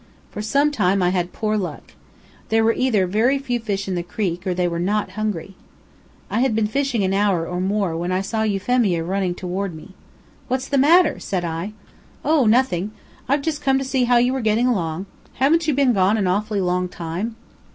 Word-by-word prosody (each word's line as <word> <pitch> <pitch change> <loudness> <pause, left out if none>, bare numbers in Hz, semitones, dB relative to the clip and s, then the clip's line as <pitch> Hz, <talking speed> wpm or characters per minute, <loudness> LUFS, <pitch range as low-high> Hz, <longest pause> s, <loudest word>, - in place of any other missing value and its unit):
For 210 - -5
some 280 +8 +2
time 195 -7 +1
I 180 - +3
had 180 -1 -1
poor 215 -1 -1
luck. 185 -4 -5 0.6
There 225 0 +3
were 225 +1 +3
either 225 -7 +2
very 225 +9 +2
few 250 -3 -2
fish 200 -3 -3
in 190 - -2
the 175 - -1
creek, 180 0 -3
or 180 - 0
they 180 0 +1
were 170 -1 -2
not 200 +2 0
hungry. 195 -3 -3 0.7
I - - -1
had 255 -3 +2
been 220 -1 +2
fishing 245 -1 0
an 190 0 +1
hour 195 -4 +1
or 180 0 -3
more 195 -3 0
when 175 +2 -2
I 185 +1 +1
saw 220 +3 -2
Euphemia 205 -3 +1
running 185 0 -1
toward 185 0 -4
me. 175 +5 -12 0.5
"What's 260 +1 -2
the 280 - +2
matter?" 330 +5 +5
said 185 -3 -2
I. 170 +5 -4 0.5
"Oh! 300 -6 +3
nothing. 215 -5 +2 0.4
I've 280 +1 +2
just 305 -1 -2
come 270 -1 +2
to 270 - -2
see 260 -1 +1
how 245 0 +4
you 245 +2 +3
were 265 - -2
getting 220 +2 +2
along. 180 -7 -1 0.3
Haven't 315 +5 +2
you 300 - +2
been 270 -3 +3
gone 195 +1 +3
an 200 - 0
awfully 205 +2 0
long 180 0 0
time? 175 +7 -4
210 Hz, 205 wpm, -21 LUFS, 180-245 Hz, 0.7 s, matter